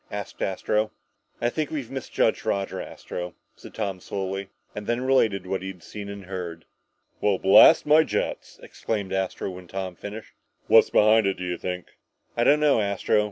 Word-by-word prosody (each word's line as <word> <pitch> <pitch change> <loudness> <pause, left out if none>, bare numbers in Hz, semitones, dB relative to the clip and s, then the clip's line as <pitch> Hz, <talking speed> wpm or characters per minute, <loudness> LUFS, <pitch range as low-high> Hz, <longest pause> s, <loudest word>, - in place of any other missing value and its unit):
asked 100 -1 -7
Astro. 105 +3 0 0.5
"I 120 - +1
think 155 +2 -2
we've 140 -7 -5
misjudged 130 -4 0
Roger, 100 -3 -2
Astro," 90 0 -7 0.2
said - - -13
Tom 100 -4 -3
slowly. 95 +1 -4 0.2
And 105 0 -7
then 120 +1 0
related 115 -8 +2
what 95 0 -2
he 95 - -6
had 90 -3 -9
seen 105 -1 -8
and 100 -1 -8
heard. 90 -3 -6 0.6
"Well, 100 -2 +2
blast 95 +2 +7
my 155 +2 +6
jets!" - - -3
exclaimed 100 -4 -4
Astro, 95 0 -2
when 90 -1 -10
Tom 95 0 -4
had - - -29
finished. 105 +2 -8 0.3
"What's - - +6
behind 110 0 +5
it, 95 - -1
do 90 - -6
you 90 -1 -2
think?" 90 0 -4 0.5
"I 120 - +2
don't 150 +4 +5
know, 145 -7 +4
Astro. 100 0 +1
100 Hz, 180 wpm, -25 LUFS, 95-110 Hz, 0.6 s, blast